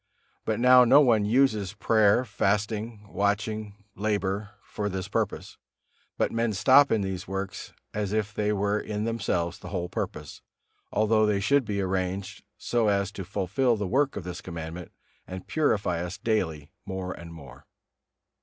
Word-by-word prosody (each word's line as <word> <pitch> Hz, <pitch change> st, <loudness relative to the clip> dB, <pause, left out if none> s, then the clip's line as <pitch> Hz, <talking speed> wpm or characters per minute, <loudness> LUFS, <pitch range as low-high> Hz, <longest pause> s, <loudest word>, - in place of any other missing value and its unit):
But -, -, -1 dB
now 125 Hz, +1 st, +7 dB
no 125 Hz, +4 st, +7 dB
one 115 Hz, -7 st, +4 dB
uses 110 Hz, -4 st, +2 dB
prayer, 110 Hz, +2 st, +3 dB
fasting, 105 Hz, +1 st, -1 dB
watching, 105 Hz, +1 st, -2 dB
labor 100 Hz, -1 st, -1 dB
for 105 Hz, -1 st, -4 dB
this 95 Hz, 0 st, -4 dB
purpose, 100 Hz, -, -3 dB, 0.6 s
but -, -, +1 dB
men 115 Hz, -1 st, 0 dB
stop 130 Hz, +9 st, +5 dB
in 110 Hz, -, +2 dB
these 95 Hz, -1 st, -4 dB
works 95 Hz, 0 st, -5 dB, 0.2 s
as 105 Hz, -2 st, -2 dB
if 105 Hz, -1 st, -1 dB
they 105 Hz, 0 st, 0 dB
were 105 Hz, 0 st, 0 dB
in 105 Hz, 0 st, -4 dB
themselves 100 Hz, -6 st, -1 dB
the -, -, -9 dB
whole 90 Hz, -3 st, -3 dB
purpose, -, -, -5 dB, 0.5 s
although 110 Hz, 0 st, +3 dB
they 105 Hz, -2 st, +1 dB
should 140 Hz, +6 st, +2 dB
be 100 Hz, -2 st, -2 dB
arranged 95 Hz, +1 st, -3 dB
so 120 Hz, -2 st, 0 dB
as 100 Hz, -1 st, +1 dB
to 100 Hz, -, -6 dB
fulfil 105 Hz, +6 st, 0 dB
the 105 Hz, -, -2 dB
work 135 Hz, +8 st, +1 dB
of 100 Hz, -, -5 dB
this 90 Hz, +1 st, -6 dB
Commandment 85 Hz, 0 st, -7 dB, 0.4 s
and 95 Hz, 0 st, -7 dB
purify 100 Hz, -, 0 dB
us 90 Hz, +2 st, -5 dB
daily 80 Hz, -10 st, -1 dB
more 95 Hz, -2 st, -4 dB
and 85 Hz, 0 st, -10 dB
more. 75 Hz, -6 st, -13 dB
105 Hz, 155 wpm, -27 LUFS, 95-110 Hz, 0.6 s, now